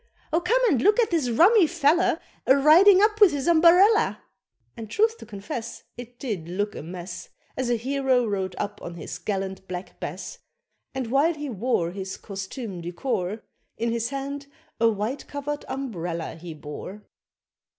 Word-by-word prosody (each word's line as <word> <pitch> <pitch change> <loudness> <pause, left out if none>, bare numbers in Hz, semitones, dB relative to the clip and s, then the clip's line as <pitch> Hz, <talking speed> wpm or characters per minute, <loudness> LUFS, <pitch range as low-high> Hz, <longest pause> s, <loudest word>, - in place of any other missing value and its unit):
Oh 330 - +3
come 450 +8 +2
and 275 - +2
look 415 - +4
at 460 - +2
this 310 -7 +1
rummy 350 - +5
fella 330 +1 +2 0.3
A 265 - +7
riding 365 +8 +7
up 425 0 +2
with 405 -4 +8
his 285 0 -3
umberella!" 350 +6 +5 0.5
And 225 -3 -8
truth 445 - +2
to - - -11
confess, 215 +2 -6
It 245 0 -10
did 205 - -4
look 205 +3 -2
a - - -7
mess, 175 +2 -8 0.3
As 255 -2 -2
a 240 - +3
hero 260 +1 +1
rode 195 -3 -2
up 205 0 -4
on 170 - -7
his 170 - -7
gallant 190 -2 -4
Black 180 0 -7
Bess, - - -6 0.6
And 255 -3 -3
while 300 +5 +3
he 295 -1 -5
wore 205 -6 0
His 190 0 -6
costume 195 0 -7
du 170 +1 -5
corps, 205 -1 -3 0.3
In 230 0 -1
his 230 0 -1
hand 280 +1 -5 0.3
a 230 0 +5
white 220 +6 -3
covered 290 +1 -5
umbrella 175 -11 -4
he 165 -1 -9
bore. 155 +7 -9
245 Hz, 170 wpm, -25 LUFS, 195-295 Hz, 0.6 s, with